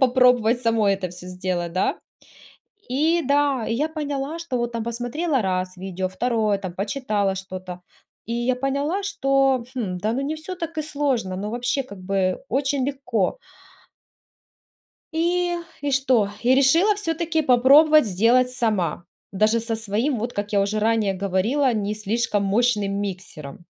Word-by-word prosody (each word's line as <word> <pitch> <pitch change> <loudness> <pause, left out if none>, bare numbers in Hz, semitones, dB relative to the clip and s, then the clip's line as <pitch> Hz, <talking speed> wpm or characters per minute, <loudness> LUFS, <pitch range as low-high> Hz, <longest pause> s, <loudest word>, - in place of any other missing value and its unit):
попробовать 250 -2 +4
самой 225 -4 +2
это 190 -1 -4
всё 180 +1 -11
сделать, 180 -2 -3
да. 185 - 0 0.9
И 320 +6 +2
да, 280 -2 +2
я 265 +7 0
поняла, 295 -1 -4
что 330 -7 -3
вот 240 0 -2
там 230 - -2
посмотрела 245 +5 -1
раз 185 -1 -2
видео, 185 0 -3
второе, 215 +1 0
там 185 -3 -6
почитала 205 -1 -1
что-то, 185 -1 -7 0.5
и 230 - -4
я 240 +2 0
поняла, 280 +9 -1
что, 275 -9 +1
хм, 195 -7 -2
да 215 - 0
ну, 255 - -1
не 290 +3 -2
всё 315 +4 -7
так 330 -2 -6
и - - +1
сложно, 275 -11 -1
но 205 +2 -4
вообще, 245 +4 -1
как 200 -6 -11
бы, 185 0 0
очень 270 0 0
легко. 265 - -1 1.8
И 350 +2 0 0.2
и 285 0 -2
что, 255 -6 +2
и 250 +2 +4
решила 325 +10 +4
всё-таки 330 -4 -1
попробовать 285 +4 +6
сделать 235 +6 +3
сама, 210 - -1 0.3
даже 215 +4 +2
со 225 0 -2
своим, 225 +4 -1
вот 235 +3 -3
как 205 +1 -4
я 200 - +3
уже 205 +2 0
ранее 215 -2 +1
говорила, 200 +9 +1
не 210 0 -1
слишком 215 -1 -1
мощным 210 -1 +1
миксером. 175 -6 -7
235 Hz, 150 wpm, -23 LUFS, 200-275 Hz, 1.8 s, попробовать